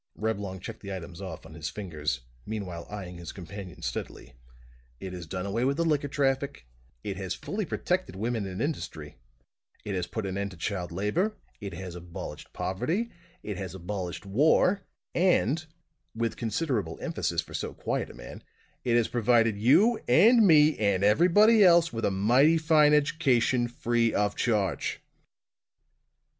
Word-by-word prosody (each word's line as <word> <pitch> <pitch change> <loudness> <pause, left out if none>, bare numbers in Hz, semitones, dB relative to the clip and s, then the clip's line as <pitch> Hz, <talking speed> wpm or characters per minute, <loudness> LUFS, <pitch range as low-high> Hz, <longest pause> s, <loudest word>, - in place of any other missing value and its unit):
Reblong 100 -3 -3
checked - - -7
the 100 - -8
items 90 -1 -7
off 95 -5 -7
on 80 - -12
his 80 0 -5
fingers, 75 -10 -3 0.2
meanwhile 95 -4 -5
eying 95 -4 -7
his 85 -1 -7
companion 95 0 -9
steadily: 60 - -5 0.7
"It 95 -1 -6
has 90 -3 -7
done 90 +2 -4
away 105 +5 -1
with 140 +2 +1
the 170 - +1
liquor 150 -3 +1
traffic; 140 - -1 0.4
it 100 -2 -4
has 95 -2 -3
fully - - -4
protected 95 - -2
women 110 0 -2
in 95 +3 -5
industry; 80 - -4 0.7
it 105 - -3
has 90 -2 -2
put 110 -3 -4
an 95 0 -3
end 100 0 -2
to 90 - -12
child 90 0 -3
labor; 105 - -1 0.2
it 100 -2 -6
has 95 -2 -7
abolished 90 -1 -8
poverty; 170 - -2 0.3
it 105 -3 -4
has 95 -1 -6
abolished 90 -1 -5
war; 155 - +3 0.3
and" 165 - +2 0.5
with 115 0 -1
considerable 115 - -2
emphasis - - -1
for - - -14
so - - -3
quiet - - -3
a - - -12
man - - -10 0.4
"it 120 -2 +2
has 115 - +2
provided 115 -2 +3
you 180 - +4
and 215 - +6
me 155 -2 +6
and 100 -3 +2
everybody 185 - +6
else 170 -4 +5
with 115 -1 -2
a - - +3
mighty 120 +12 +4
fine 155 -2 +5
education, 130 -5 +2
free 120 -1 0
of 105 0 +1
charge!" 105 -6 0
105 Hz, 160 wpm, -28 LUFS, 95-145 Hz, 0.7 s, and